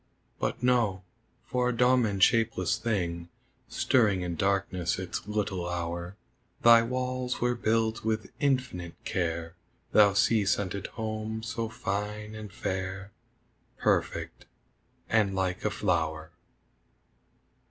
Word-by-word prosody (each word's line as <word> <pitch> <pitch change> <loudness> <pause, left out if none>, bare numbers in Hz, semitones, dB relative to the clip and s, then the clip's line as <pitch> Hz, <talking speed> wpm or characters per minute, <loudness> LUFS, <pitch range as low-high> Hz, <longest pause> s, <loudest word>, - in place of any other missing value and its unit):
But - - -2
no! 115 -7 +2 0.4
For 125 0 0
a 120 - -2
dumb 125 -1 +4
and 100 -2 +1
shapeless 110 -7 +3
thing 85 -7 -2 0.4
Stirring 105 -7 +2
in 90 -1 -3
darkness 95 -2 0
its 95 +2 -5
little 100 -4 -2
hour, 85 +2 -4 0.5
Thy 115 0 +8
walls 125 +1 -2
were 125 0 +2
built 115 -1 0
with 110 -2 -2
infinite 130 - -1
care, 85 -2 -2 0.4
Thou 105 -2 +6
sea 105 +1 +3
scented 100 0 -1
home, 110 0 -3
so 115 -1 -3
fine 105 0 -4
and 105 -2 -8
fair, 95 -2 -4 0.7
Perfect - - -1 0.6
and 105 -3 +2
like 95 -1 -1
a 105 - +2
flower! 80 -6 -1
105 Hz, 115 wpm, -29 LUFS, 95-115 Hz, 0.7 s, Thy